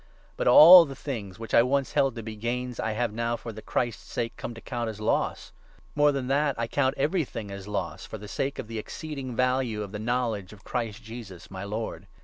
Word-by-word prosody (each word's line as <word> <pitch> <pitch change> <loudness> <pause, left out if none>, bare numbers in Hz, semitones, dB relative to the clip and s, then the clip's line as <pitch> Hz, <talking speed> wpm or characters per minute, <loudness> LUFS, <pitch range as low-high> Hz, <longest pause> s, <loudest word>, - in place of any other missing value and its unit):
But - - -2
7 - - +6
all 175 +5 +11
the 135 -2 -8
things 110 -10 -6
which 115 0 -8
I - - +8
once 130 0 +1
held 135 -2 +2
to 115 - -6
be 110 0 -6
gains 125 +3 -3
I 110 - -1
have 115 -1 -1
now, 115 +1 -1
for 115 - -7
the 110 - -9
Christ's 120 -1 -3
sake, 115 0 -2
come 120 - -6
to - - -9
count 120 -1 -3
as 110 -1 -7
loss. 110 - -1 0.4
More 145 0 +4
than 135 -2 -2
that, 140 +2 +1
I - - 0
8 115 - -4
count 135 -1 +2
everything 135 - -1
as 100 0 -8
loss, 95 -4 -3
for 110 - -7
the 105 0 -10
sake 135 +7 -2
of - - -4
the 115 -1 -4
exceeding 135 +1 -6
value 125 -4 +1
of 100 - -8
the 105 - -5
knowledge 110 -4 -1
of 105 - -16
Christ 115 -2 -4
Jesus 110 -6 -10
my 95 0 -6
Lord. 105 +3 -5
115 Hz, 235 wpm, -27 LUFS, 110-130 Hz, 0.4 s, all